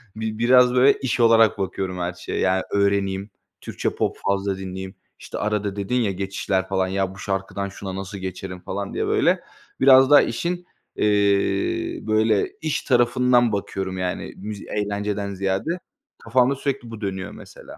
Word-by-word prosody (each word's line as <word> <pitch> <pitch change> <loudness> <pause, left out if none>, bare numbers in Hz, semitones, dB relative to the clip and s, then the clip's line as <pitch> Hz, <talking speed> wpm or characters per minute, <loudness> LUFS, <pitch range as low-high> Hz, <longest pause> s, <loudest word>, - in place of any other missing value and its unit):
bi 110 0 -4
biraz, 125 +1 +5
böyle, 130 +2 +5
iş 130 -1 -1
olarak 115 -2 +5
bakıyorum 95 -1 -3
her 90 0 -2
şeye, 90 - -5
yani, 95 0 +2
öğreneyim. 100 0 +1 0.3
Türkçe - - -2
pop - - -1
fazla 100 0 0
dinleyeyim, 95 0 -7 0.2
işte, - - -7
arada 105 -1 -1
dedin 100 +4 -2
ya 115 -5 +2
geçişler, 95 0 -2
falan, 95 -1 0
ya 95 0 -1
"Bu - - -13
şarkıdan 100 0 -3
şuna 95 -1 -7
nasıl 95 +1 -6
geçerim?" 95 -1 -6
falan 100 +2 -5
diye, - - -1
böyle, - - +3 0.4
biraz 130 0 +7
daha 145 - +9
işin, 175 +1 -2 0.3
eee, - - 0 1.0
böyle, 110 -1 +2
iş 155 -2 -1
tarafından 120 -1 +3
bakıyorum, 95 -2 -3
yani, 90 -1 -3
müz 105 +1 -6
eğlenceden 105 -1 -3
ziyade 95 - -1 0.4
kafamda 125 +3 +3
sürekli 135 -3 -3
bu 115 -1 -8
dönüyor, 95 -2 -4
mesela. - - -12
100 Hz, 155 wpm, -23 LUFS, 95-120 Hz, 1.0 s, daha